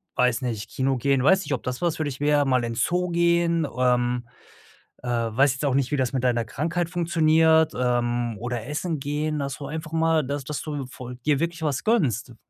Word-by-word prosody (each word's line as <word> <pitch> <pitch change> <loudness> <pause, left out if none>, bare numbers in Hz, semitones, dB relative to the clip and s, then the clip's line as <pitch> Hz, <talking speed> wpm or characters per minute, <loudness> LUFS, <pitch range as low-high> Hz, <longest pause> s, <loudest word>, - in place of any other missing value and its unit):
weiß 125 -1 +2
nicht, 110 -3 -4
Kino 135 0 0
gehen, 135 +1 +1
weiß 190 +6 +5
nicht, - - -2
ob 130 - -3
das 125 +3 -4
was 170 -2 0
für 155 - -1
dich 140 -3 -4
wäre, 145 -1 +3
mal 130 -2 +2
in 115 0 -3
Zoo 180 +9 0
gehen, 170 -1 +2
ähm, 125 -1 +1 0.8
äh, 125 - -6
weiß 120 +3 +2
jetzt 135 +3 -5
auch 135 - +1
nicht, 135 -2 +1
wie 145 - +2
das 130 0 0
mit 130 -1 -1
deiner 120 -2 +2
Krankheit 165 +7 -2
funktioniert, 160 -2 +3
ähm, 120 -2 0
oder 120 -1 -4
Essen 155 +2 -3
gehen, 150 +2 -2
dass 140 -1 -4
du 140 - -6
einfach 155 +2 -6
mal 160 -2 +2
dass 140 0 -3
dass 150 +1 -4
du 145 -4 -4
voll 125 -1 -9
dir 150 -2 +2
wirklich 170 0 -2
was 145 -4 -1
gönnst. 130 - +1
140 Hz, 210 wpm, -24 LUFS, 125-160 Hz, 0.8 s, weiß